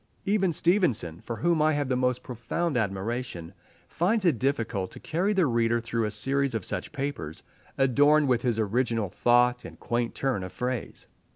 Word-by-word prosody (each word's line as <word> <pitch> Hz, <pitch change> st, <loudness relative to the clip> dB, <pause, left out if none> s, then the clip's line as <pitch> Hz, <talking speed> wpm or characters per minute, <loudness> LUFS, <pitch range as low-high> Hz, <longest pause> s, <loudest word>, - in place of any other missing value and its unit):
Even 195 Hz, -2 st, +2 dB
Stevenson, 150 Hz, -, +1 dB
for 115 Hz, -, -5 dB
whom 170 Hz, +3 st, +1 dB
I 155 Hz, 0 st, +4 dB
have 145 Hz, -1 st, -1 dB
the 130 Hz, -, 0 dB
most 125 Hz, 0 st, 0 dB
profound 125 Hz, +7 st, -3 dB
admiration, 100 Hz, -3 st, -3 dB, 0.3 s
finds 195 Hz, +5 st, 0 dB
it 155 Hz, -10 st, +3 dB
difficult 115 Hz, -8 st, -1 dB
to -, -, -10 dB
carry 180 Hz, +6 st, -1 dB
the 190 Hz, -4 st, +3 dB
reader 120 Hz, -2 st, +2 dB
through 115 Hz, -1 st, -2 dB
a -, -, -1 dB
series 135 Hz, +5 st, 0 dB
of 110 Hz, -, -2 dB
such -, -, -3 dB
papers, 140 Hz, -, -5 dB, 0.3 s
adorned 145 Hz, +3 st, +4 dB
with 125 Hz, -2 st, +2 dB
his 120 Hz, -3 st, 0 dB
original 115 Hz, -1 st, 0 dB
thought 120 Hz, +3 st, +3 dB
and -, -, -11 dB
quaint 120 Hz, 0 st, -2 dB
turn 130 Hz, -7 st, -1 dB
of 90 Hz, -, -6 dB
phrase. 125 Hz, +2 st, -4 dB
125 Hz, 175 wpm, -27 LUFS, 115-145 Hz, 0.3 s, I